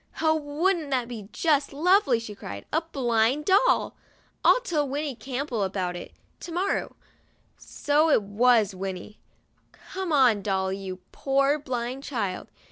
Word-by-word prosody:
"Oh, 315 0 +3
wouldn't 315 +2 -1
that 255 -3 0
be 220 -5 -8
just 295 -4 +1
lovely!' 320 - +3
she 225 -2 -7
cried. 100 - -8
"A 320 - +3
blind 260 -2 0
doll! 400 +6 +3 0.5
I'll - - +5
tell 305 - -1
Winnie 290 +1 -2
Campbell 260 -1 -4
all - - +1
about 185 -2 -3
it 175 - -8 0.3
to 345 - -8
morrow." 365 +4 -1 0.6
So 300 +2 +1
it 230 - +4
was 215 0 +3
Winnie! 190 +2 -6 0.5
"Come 380 -2 -6
on, 250 -8 +4
Dolly, 190 -1 -1
you 190 -2 -7
poor 275 +2 +1
blind 255 -1 -4
child. 205 -10 -3
265 Hz, 145 wpm, -26 LUFS, 210-305 Hz, 0.6 s, I'll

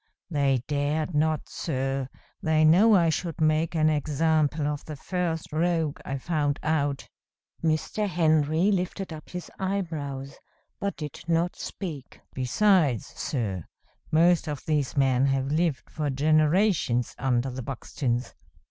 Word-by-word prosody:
They 135 -5 +2
dared 150 +3 -1
not, 155 +1 +1
sir; 135 -3 -2 0.3
they 155 0 +3
know 200 +8 +6
I 170 -3 +4
should 170 +1 -2
make 155 +1 +2
an 155 -1 +3
example 155 0 +1
of 145 -1 -2
the 155 - -6
first 165 0 -3
rogue 165 -2 0
I 135 - -3
found 145 0 0
out." 145 -3 0 0.6
Mr. 165 +6 0
Henry 160 +1 +2
lifted 185 -1 -2
up 155 - -10
his 180 -1 -7
eyebrows, 155 -8 -3 0.4
but 200 0 -2
did 150 -3 -6
not 170 +1 +1
speak. 155 -9 -7
"Besides, 140 - +2
sir, 100 - -3 0.5
most 170 +1 +4
of 145 -3 -5
these 150 -3 0
men 135 -1 +3
have 135 0 0
lived 155 -3 0
for 150 -2 -3
generations 155 - +2
under 130 -1 +1
the 130 +1 -5
Buxtons. 125 -1 -3
155 Hz, 130 wpm, -26 LUFS, 140-165 Hz, 0.6 s, know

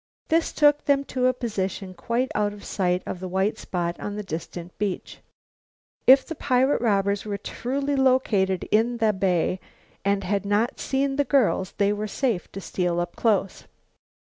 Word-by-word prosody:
This 325 +1 +2
took 295 -1 +3
them 280 -1 +3
to 255 -1 +2
a 255 - +3
position 195 -5 -3
quite 235 +7 -1
out 205 -1 0
of 205 - -12
sight 180 -2 0
of 180 - -5
the 185 - -5
white 190 +4 0
spot 175 -1 -3
on 205 - -4
the 210 - -4
distant 170 0 -7
beach. 200 -3 -3 0.9
If 265 +1 +8
the 330 - -5
pirate 265 -2 +1
robbers 200 -3 +1
were 205 -2 -3
truly 275 +7 -2
located 235 -9 +2
in 235 +3 +2
the 220 -2 +2
bay 185 -1 0 0.4
and 200 0 +1
had 200 +2 -1
not 205 +4 0
seen 270 0 -1
the 285 - +3
girls 250 -9 +1
they 200 0 +2
were 210 +1 -3
safe 225 -3 -2
to 195 - -5
steal 175 -2 -1
up 175 0 -3
close. 200 -4 0
210 Hz, 170 wpm, -25 LUFS, 190-255 Hz, 0.9 s, If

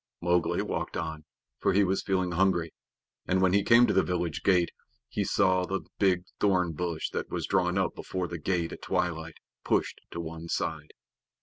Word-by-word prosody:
Mowgli 85 -1 +1
walked - - -3
on, 80 -2 -4 0.3
for - - +2
he 100 +2 +5
was 95 0 +1
feeling 95 -2 0
hungry, 85 -2 +1 0.5
and 95 - +2
when 95 -1 +3
he 100 - +5
came 120 +3 +7
to 105 - +1
the 95 - +5
village 85 -4 -2
gate 90 -3 +3 0.4
he - - -1
saw 95 -2 +2
the 95 +1 -2 0.2
big 95 -3 +3 0.2
thorn 90 -4 +2
bush 85 0 -3
that - - -3
was - - -2
drawn 90 -1 +1
up 95 -3 +1
before 90 -1 -4
the 85 0 -6
gate 85 +1 -1
at - - -8
twilight, 80 -2 -2 0.3
pushed - - 0
to - - -6
one 85 0 -6
side. 80 -2 -3
90 Hz, 185 wpm, -28 LUFS, 85-95 Hz, 0.5 s, came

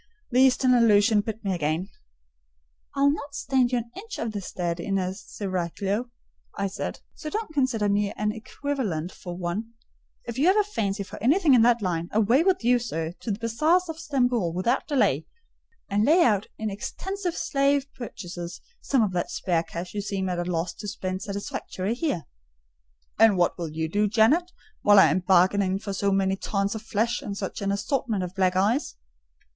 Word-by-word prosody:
The 250 - +3
Eastern 260 -1 +4
allusion 215 -2 +5
bit 220 0 -6
me 195 - +1
again. 165 +3 -1 1.1
"I'll 280 0 +4
not 285 -1 -5
stand 260 -3 +1
you 250 - +2
an 235 0 -5
inch 415 +3 -7
in 230 - -2
the 205 -2 -4
stead 175 -2 -3
of 195 +3 -1
a 185 -1 -1
seraglio," 195 +3 -3 0.5
I 200 - 0
said; 195 - -4
"so 310 - -7
don't 425 -3 -4
consider 255 -7 +1
me 205 0 +1
an 210 0 -1
equivalent 220 - -3
for 175 -2 -8
one. 200 +6 -4 0.5
If 235 +1 -5
you 300 - +4
have 380 +3 +5
a 420 - +5
fancy 205 - -2
for - - -10
anything 295 - +4
in 245 - +6
that 235 -1 +4
line, 170 -2 -1
away 225 +6 +4
with 370 -6 +2
you, 245 +1 +4
sir, 165 -9 -3
to - - -6
the 200 - -1
bazaars 310 +11 +1
of 325 0 -5
Stamboul 245 - +1
without 210 +9 0
delay, 205 - +1 0.6
and 205 +1 +1
lay 330 +8 +5
out 210 -3 +2
in 220 -1 -3
extensive 365 - -4
slave 275 0 +1
purchases 175 -7 -7 0.2
some 265 -5 +2
of 205 - 0
that 175 -1 -2
spare 170 -3 0
cash 170 +2 -7
you 205 - -2
seem 195 -2 -2
at 180 -1 -2
a 175 +1 -2
loss 170 +1 -1
to 205 - -8
spend 185 -1 -4
satisfactorily 200 -1 -4
here." 255 - -2 1.0
"And 220 -3 +6
what 175 - +2
will 170 -3 -4
you 160 +1 -2
do, 205 +6 +1
Janet, 250 - +3 0.3
while 205 0 +6
I 165 -6 +7
am 175 - +2
bargaining 190 +1 +3
for 200 0 -5
so 200 +1 0
many 195 0 +1
tons 200 0 -1
of 220 - -5
flesh 225 +2 -1
and 200 -1 -5
such 195 0 -5
an 200 0 0
assortment 215 -1 -1
of 180 0 -5
black 185 -1 +1
eyes?" 210 +9 +1
210 Hz, 190 wpm, -26 LUFS, 185-250 Hz, 1.1 s, I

